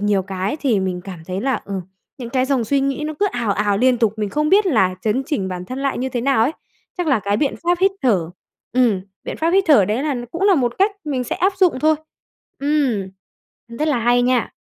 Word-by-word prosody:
nhiều 205 -2 +1
cái 195 +6 -3
thì 235 -8 +2
mình 185 -1 -2
cảm 190 -3 -8
thấy 185 +1 -3
là, 260 -3 0
ừm, 195 -1 -4 0.4
những 240 -2 -7
cái 255 +1 +1
dòng 265 -4 +1
suy 275 +5 +1
nghĩ 275 +2 -1
nó 310 - -4
cứ 410 - +4
ào 235 -4 0
ào 205 0 0
liên 250 +1 +3
tục, 225 -3 +2
mình 210 -2 -2
không 300 +5 0
biết 395 +3 +4
là 195 - +2
chấn 225 +5 0
chỉnh 245 - -2
bản 180 -1 -5
thân 255 +7 -6
lại 275 0 -1
như 260 +2 -1
thế 245 -2 -3
nào 265 -2 +2
ấy. 275 - +1 0.5
Chắc 355 - -1
là 270 -7 +2
cái 200 0 0
biện 275 +5 0
pháp 350 0 +2
hít 385 +1 +5
thở 190 -10 +1 0.4
ừm, 240 -6 +2 0.2
biện - - -5
pháp 325 +1 +1
hít 385 +2 +3
thở 275 -10 +6
đấy 215 +7 -1
là 290 -3 -1
cũng 335 +6 -5
là 400 -1 +5
một 245 -6 0
cách 395 +3 +4
mình 270 -4 -2
sẽ - - -3
áp 380 +2 +2
dụng 365 -8 +3
thôi. 315 +1 +4 0.6
Ừm, 275 -9 0 0.7
rất 305 - 0
là 285 -5 +1
hay 240 +1 +3
nha. 250 -1 +1
250 Hz, 245 wpm, -20 LUFS, 205-295 Hz, 0.7 s, thở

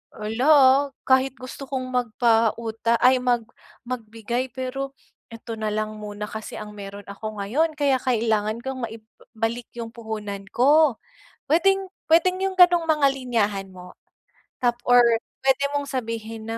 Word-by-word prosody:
"ala, 220 +4 -3
ah 270 -4 +8 0.4
kahit 260 0 +4
gusto 255 +2 -8
kong 255 -2 -3
magpauta 230 -1 +1
ay 255 +1 +6
mag 245 -2 +1 0.4
magbigay 235 +1 -4
pero 270 +1 -4 0.4
ito 230 0 -7
nalang 215 0 -2
muna 210 0 -6
kasi 220 0 -7
ang 210 -1 -8
mayro'n 200 0 -9
ako 215 +1 -7
ngayon 290 +12 +1
kaya 280 -2 +3
kailangan 220 -3 0
kong 265 -1 -5
maibalik 225 +1 -6
yung 235 -1 -5
puhunan 215 -4 -6
ko." 285 0 +4 0.5
Puwedeng 385 +4 +3 0.2
puwedeng 365 +3 +4
yung 385 - -3
ganong 350 -2 +6
mga 300 -3 +4
linyahan 225 -7 -1
mo 180 -1 -12 0.7
tap 240 -1 +2
or 245 0 +7 0.4
puwede 270 +1 +3
mong 285 0 -1
sabihin 225 -3 -4
na 225 - -3
235 Hz, 140 wpm, -24 LUFS, 220-265 Hz, 0.7 s, ah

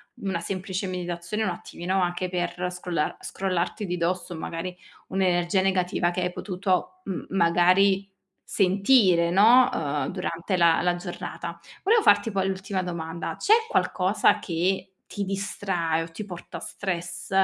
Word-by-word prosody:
una 190 -4 -3
semplice 190 +1 -3
meditazione, 180 +3 -3
un 185 - 0
attimino, 180 +2 -3
anche 180 +1 -1
per 180 0 -2
scrollar 180 -3 -2
scrollarti 190 +2 -2
di 180 - -2
dosso, 175 0 -2
magari, 165 +3 -5 0.3
un'energia 185 -1 +1
negativa 180 -2 +1
che 180 - -3
hai 180 0 -1
potuto, 185 -1 -2
mhmm, 190 -2 -4
magari, 190 +2 +3 0.3
sentire, 190 -3 +3
no, 230 +7 +6
uhm, 145 -2 -1
durante 180 0 -2
la 170 -1 +4
la 175 0 +1
giornata. 170 -1 -6 0.2
Volevo 445 +3 +4
farti 205 - +4
poi 195 -2 0
l'ultima 190 0 -2
domanda, 170 -2 -4
c'è 425 - +4 0.2
qualcosa 190 - +2
che 185 +2 -1 0.2
ti 205 -1 -2
distrae 190 -4 -1
o - - -7
ti 205 +6 -7
porta 175 -3 -8
stress 175 -3 -5
180 Hz, 140 wpm, -26 LUFS, 175-195 Hz, 0.3 s, no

